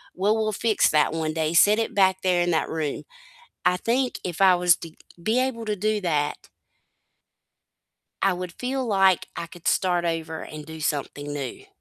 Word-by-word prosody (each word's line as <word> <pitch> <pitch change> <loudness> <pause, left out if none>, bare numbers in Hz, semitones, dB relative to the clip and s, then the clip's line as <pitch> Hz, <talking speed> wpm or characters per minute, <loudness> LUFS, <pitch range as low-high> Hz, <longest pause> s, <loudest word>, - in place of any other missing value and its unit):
"Well, 205 +3 +2
we'll 215 -1 0
fix 215 +1 +2
that 150 -1 +3
one 160 -1 -2
day," 160 0 -1
set 210 +6 +6
it 225 - -2
back 190 -2 +3
there 180 -2 +2
in 175 - 0
that 160 - 0
room. 155 -3 -3 0.6
I 180 - +3
think 245 +6 0
if 175 0 -4
I 190 -2 +7
was 175 -1 +4
to 165 - -9 0.3
be 220 +7 +1
able 245 -3 -2
to 210 -1 -1
do 215 +2 0
that 150 -5 -1 1.8
I 195 - +4
would 180 -1 -5
feel 260 +1 -3
like 195 -5 +3
I 170 - -4
could 170 0 -6
start 180 -2 +1
over 165 -1 -3
and 155 -1 -8
do 160 +1 -9
something 145 -1 -3
new. 145 - -6
180 Hz, 185 wpm, -24 LUFS, 160-210 Hz, 1.8 s, I